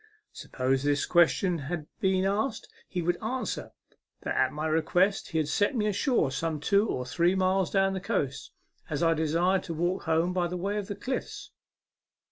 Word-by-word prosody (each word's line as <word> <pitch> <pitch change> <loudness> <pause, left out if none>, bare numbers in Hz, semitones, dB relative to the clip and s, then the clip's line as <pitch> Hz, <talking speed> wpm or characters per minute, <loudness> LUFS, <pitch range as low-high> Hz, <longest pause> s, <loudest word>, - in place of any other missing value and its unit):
Supposing 135 +2 -1
this 145 0 +1
ques 175 -2 +5
tion 180 -4 -1 0.7
asked, 210 +7 -1 0.2
he 180 -2 -2
would 175 +1 0
answer 250 +4 -3 0.5
that - - -3
at - - +2
my 150 +1 -4
request 175 +5 +2
he 165 - -3
had 155 -2 +1
set 205 - +1
me 215 -3 +1
ashore 210 - +1
some 155 +2 -2
two 200 +7 +2
or 125 - -2
three 170 +8 +2
miles 190 -1 +2
down 195 -1 +2
the 190 - -3
coast, 180 - -2 0.4
as 155 +1 -1
I 165 0 +4
desired 165 +4 +1
to 165 - -5
walk 175 +4 -1
home 165 +2 +1
by 180 -1 +1
way 180 +4 -2
of 205 -2 -3
the 205 - -4
cliffs. 260 +5 -5
175 Hz, 175 wpm, -28 LUFS, 160-195 Hz, 0.7 s, ques